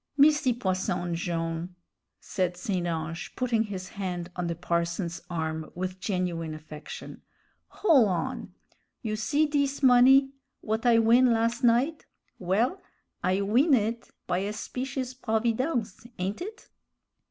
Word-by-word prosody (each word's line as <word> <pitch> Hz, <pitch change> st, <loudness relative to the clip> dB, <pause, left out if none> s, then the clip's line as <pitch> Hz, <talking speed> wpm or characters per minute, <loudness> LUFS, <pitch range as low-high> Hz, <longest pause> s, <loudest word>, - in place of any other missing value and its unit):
"Misty 295 Hz, -2 st, +5 dB
Posson 185 Hz, -5 st, -1 dB
Jone'," 165 Hz, +1 st, -3 dB, 0.4 s
said 180 Hz, -3 st, -2 dB
St. 180 Hz, -1 st, -2 dB
Ange, 165 Hz, 0 st, -4 dB
putting 230 Hz, -3 st, +1 dB
his 185 Hz, -3 st, -6 dB
hand 180 Hz, -3 st, -4 dB
on 180 Hz, -1 st, -2 dB
the 170 Hz, -, -2 dB
parson's 170 Hz, +1 st, -2 dB
arm 160 Hz, -2 st, -3 dB
with 185 Hz, +1 st, -4 dB
genuine 175 Hz, -5 st, -2 dB
affection, 155 Hz, -1 st, -9 dB, 0.5 s
"hol' 295 Hz, -, +4 dB
on. 175 Hz, -4 st, -3 dB, 0.5 s
You 215 Hz, -2 st, -1 dB
see 220 Hz, +9 st, +1 dB
dis 280 Hz, -2 st, 0 dB
money 265 Hz, +2 st, +6 dB, 0.3 s
w'at 220 Hz, +3 st, -1 dB
I 235 Hz, -1 st, +6 dB
win 235 Hz, +2 st, +5 dB
las' 230 Hz, +1 st, +1 dB
night? 250 Hz, +7 st, +2 dB, 0.3 s
Well, 225 Hz, -, 0 dB, 0.4 s
I 185 Hz, +2 st, +2 dB
win' 255 Hz, +9 st, +4 dB
it 230 Hz, +1 st, -2 dB, 0.2 s
by 180 Hz, 0 st, 0 dB
a 200 Hz, +2 st, -2 dB
specious 255 Hz, +3 st, -4 dB
providence, 235 Hz, -, -1 dB
ain't 190 Hz, -, -3 dB
it?" 435 Hz, +5 st, -8 dB
210 Hz, 130 wpm, -27 LUFS, 175-250 Hz, 0.5 s, money